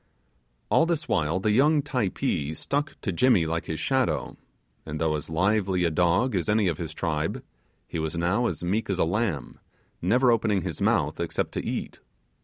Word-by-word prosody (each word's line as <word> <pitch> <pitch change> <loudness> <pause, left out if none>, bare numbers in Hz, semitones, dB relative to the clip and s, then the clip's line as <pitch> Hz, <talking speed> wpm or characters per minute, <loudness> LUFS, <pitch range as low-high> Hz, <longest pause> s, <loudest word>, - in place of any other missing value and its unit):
All 165 - +4
this 170 -2 -1
while 80 +3 +1
the 105 +2 +1
young 145 +6 +4
Typee 100 - -1
stuck 145 - -2
to 100 - -2
Jimmy 95 -1 +3
like 85 +1 -2
his 80 - -3
shadow, 130 -2 0 0.5
and 75 -1 -5
though 80 -1 +1
as 75 0 -5
lively 95 +2 +1
a 85 - +2
dog 90 +9 +2
as 90 -2 -1
any 105 -2 +3
of 80 -3 -1
his 80 -3 -4
tribe, 80 -1 -2 0.4
he 85 - -4
was 80 +1 -3
now 95 +8 +1
as 85 -4 -4
meek 100 +6 -1
as 95 - 0
a - - +3
lamb, 85 - -2 0.4
never 120 +8 +4
opening 105 -5 +1
his - - -5
mouth - - +1
except - - -2
to - - -3
eat. - - -4
95 Hz, 185 wpm, -26 LUFS, 80-115 Hz, 0.5 s, All